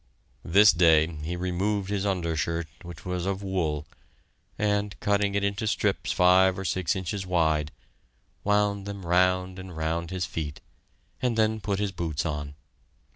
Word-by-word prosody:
This 100 +4 +6
day 80 -3 +5
he 80 +4 -4
removed 95 +3 -1
his 100 0 0
undershirt, 85 -3 -1 0.2
which 85 -2 -10
was 90 0 -2
of 100 0 -2
wool, 80 -6 -1 0.7
and, 105 -3 0
cutting 100 0 +1
it 100 - +1
into 100 +2 -1
strips - - 0
five 90 +1 +5
or 95 - -5
six 90 -2 0
inches 95 +1 -3
wide, 80 -4 +1 0.7
wound 105 -1 +1
them 100 -2 -6
round 90 +1 +2
and 95 -3 -9
round 80 +1 -2
his 90 0 -2
feet, 75 -3 -5 0.6
and 125 -3 0
then 110 0 +2
put 100 -1 -1
his 100 -1 -1
boots 85 -3 -3
on. 75 -2 -4
90 Hz, 150 wpm, -27 LUFS, 85-100 Hz, 0.7 s, This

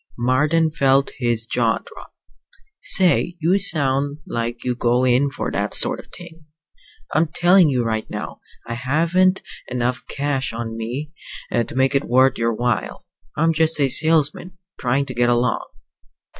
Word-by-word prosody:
Marden 150 +7 +1
felt 135 -2 +2
his 120 -3 -1
jaw 115 -1 0
drop. - - -14 0.7
"Say, 180 -2 +3
you 175 +5 +2
sound, 145 -5 +1
like 115 0 -4
you 125 - -1
go 120 +1 +1
in 130 +3 +2
for - - -5
that - - -1
sort - - +3
of - - -12
thing! 165 -3 -13 0.7
I'm 160 +1 +2
telling 175 +1 +4
you 125 -3 0
right 110 -1 -3
now, - - -7 0.2
I 115 - -5
haven't 165 +9 +1 0.2
enough 125 +1 -2
cash 140 -3 -2
on 115 -1 -5
me 125 +7 -5 0.4
to 120 0 -2
make 130 +1 +2
it 140 +1 0
worth 130 +1 +3
your 115 0 +1
while. 120 -1 -2 0.3
I'm 165 +1 +2
just 160 0 +1
a 140 -2 +2
salesman, 160 +4 +1 0.2
trying 135 +3 0
to 130 - -7
get 120 0 +1
along." 120 +1 0
135 Hz, 155 wpm, -20 LUFS, 120-160 Hz, 0.7 s, telling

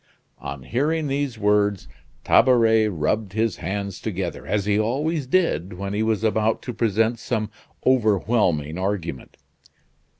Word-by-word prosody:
On 70 -1 -7
hearing 150 - 0
these 140 -3 -2
words, 105 -2 +1 0.4
Tabaret 115 -3 +4
rubbed 100 +3 -1
his 110 -2 0
hands 100 +1 -4
together, 95 -4 -4
as 105 -2 0
he 105 0 +2
always 140 +6 -1
did 125 - +1
when 100 +2 -5
he 105 - -1
was 110 -1 0
about 110 0 +1
to 125 - -5
present 115 +1 +1
some 110 -3 -2 0.3
overwhelming 105 - +2
argument. 95 -8 -4
110 Hz, 130 wpm, -23 LUFS, 95-120 Hz, 0.4 s, Tabaret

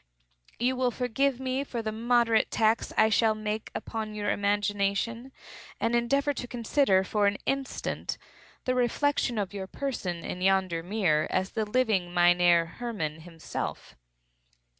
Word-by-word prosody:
You 250 +2 +1
will 255 -1 +1
forgive 250 +2 0
me 260 +1 -1
for 240 -4 -5
the 215 - -2
moderate 230 0 +2
tax 220 0 +1
I 220 0 +5
shall 220 0 +3
make 215 0 -3
upon 220 -2 -4
your 205 -1 -1
imagination, 205 +4 0 0.5
and 230 +1 +1
endeavor 275 +5 +2
to 250 - -5
consider, 235 -4 +2
for 205 +1 +1
an 200 0 +1
instant, 275 -1 -2 0.5
the 255 - +1
reflection 250 0 +1
of 200 -2 -2
your 195 -2 -5
person 190 -10 -4
in 180 - -5
yonder 190 -3 +2
mirror 175 -5 +1
as 190 - -1
the 220 -2 -1
living 210 -7 +1
Mynheer 175 -1 +5
Hermann 175 -11 -3
himself. 165 -1 -6
220 Hz, 140 wpm, -28 LUFS, 190-245 Hz, 0.5 s, I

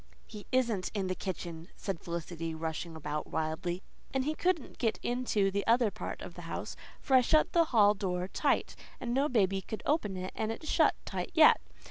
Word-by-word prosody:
"He 210 -2 -10
isn't 235 -7 +1
in 200 -2 0
the 185 - 0
kitchen," 170 -3 -5
said 195 -5 -4
Felicity 165 -1 -4
rushing 160 +1 -4
about 150 -1 -4
wildly, 165 +3 -2 0.3
"and 265 -1 0
he 305 - +1
couldn't 345 -3 -1
get 225 -3 +1
into 240 -5 +1
the 200 +1 0
other 230 -2 +4
part 215 - -6
of - - -8
the - - -9
house, - - -4 0.2
for 270 - -2
I 255 - +8
shut 310 +5 +3
the 335 -1 +5
hall 210 -7 +5
door 185 -3 -2
tight, - - 0 0.2
and 240 -1 -2
no 275 +4 +2
baby 195 -5 +2
could 215 +3 -6
open 215 - +1
it 185 0 -4
and 220 0 -1
it's 310 +7 -7
shut - - +4
tight - - -3
yet. 315 -2 +7
200 Hz, 195 wpm, -31 LUFS, 175-250 Hz, 0.3 s, I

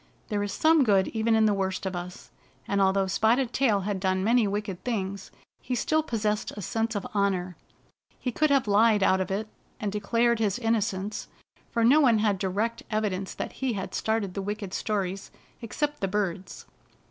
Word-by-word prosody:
There 205 -1 -1
is 205 0 -2
some 315 +3 +4
good 200 -5 +3
even 225 0 +1
in 220 0 +4
the 210 - +3
worst 190 -1 -2
of 190 -1 -2
us, 175 +1 -8 0.4
and 200 0 +1
although 195 0 +3
Spotted 230 +6 +1
Tail 225 -7 +2
had 200 0 -2
done 185 0 0
many 230 +1 +3
wicked 200 -2 -4
things, 200 -5 -3 0.3
he 250 - -3
still 310 +6 +1
possessed 215 -6 -1
a 205 - -7
sense 225 +4 -1
of 200 - -3
honor. 190 -3 0 0.6
He 250 - -3
could 305 +5 +1
have 275 -5 +3
lied 210 0 +4
out 190 -1 +3
of 185 - -3
it, 205 +3 -2 0.3
and 210 -2 -2
declared 230 +3 +1
his 210 -2 +1
inno 225 -2 +1
cence, 200 +1 -3 0.4
for 230 - 0
no 275 +7 +6
one 240 -6 +5
had 210 -3 +1
direct 205 +5 -1
evidence 205 -4 -2
that - - -4
he 265 -3 -2
had 190 -3 -5
started 220 -4 -1
the 195 - -3
wicked 205 -1 -5
stories, 195 -2 -2 0.3
except 295 +6 -3
the 195 - +1
birds. 190 -2 -3
210 Hz, 190 wpm, -27 LUFS, 195-230 Hz, 0.6 s, no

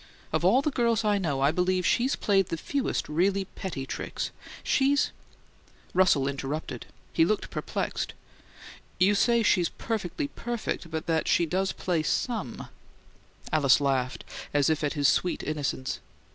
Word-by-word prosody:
Of - - +1
all 265 - +5
the 300 - +1
girls 235 -4 +1
I 205 -1 +3
know 145 -7 -1
I 140 +2 +4
believe 180 +2 +1
she's 255 +3 +2
played 195 -3 +2
the 165 - -3
fewest 275 - -2
really 190 +5 +1
petty 175 -8 -6
tricks. - - -4 0.3
She's 280 +1 +2 0.4
" - - -30
Russell 175 -7 +4
interrupted; 140 +2 -4 0.3
he - - +4
looked 210 +5 0
perplexed. - - -3 0.8
"You 190 +3 +5
say 235 +3 +3
she's 180 -5 +3
perfectly 220 - -3
perfect, 235 -10 -4
but 160 0 -4
that 160 -1 0
she 170 - +3
does 190 +4 0
play 175 -4 -1
SOME 205 - -2 0.4
" - - -19
Alice 150 0 +5
laughed, 130 -3 0 0.3
as 145 +1 +4
if 155 0 -1
at 145 - 0
his 145 -3 +2
sweet 180 - +1
innocence. 145 -3 -2
180 Hz, 155 wpm, -28 LUFS, 150-210 Hz, 0.8 s, all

